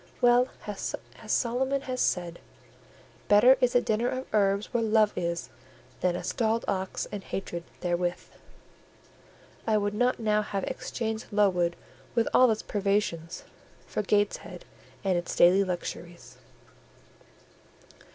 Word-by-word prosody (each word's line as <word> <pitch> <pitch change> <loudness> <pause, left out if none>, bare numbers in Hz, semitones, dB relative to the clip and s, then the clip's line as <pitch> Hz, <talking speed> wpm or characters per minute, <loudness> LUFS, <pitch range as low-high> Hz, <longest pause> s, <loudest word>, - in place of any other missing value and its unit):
Well 245 +1 +5
has 205 -2 -4 0.3
Solomon 265 +3 0
said—"Better 205 +4 0
is 250 -1 +2
a 245 - +6
dinner 225 +3 0
of 260 +1 -4
herbs 200 -1 +1
where 240 - +2
love 215 -1 +3
is, 170 -7 -3 0.5
than 180 -1 +1
a - - -4
stalled 225 -1 0
ox 190 -1 -2
and 205 -2 -5
hatred 175 -3 -5 0.2
therewith." 175 0 -1 1.4
I 215 -1 +3
would 205 0 -1
not 245 +4 +1
now 215 -1 +2
have 200 -2 -3
exchanged 220 -1 -4
Lowood 180 -4 +2 0.4
with 230 - +2
all 255 -1 +6
its 220 -1 0
privations 195 -5 -1 0.4
for - - -2
Gateshead 205 0 -1 0.4
and 185 -3 +2
its 175 - -5
daily 185 +3 +6
luxuries. 175 -1 -6
205 Hz, 120 wpm, -28 LUFS, 180-225 Hz, 1.4 s, a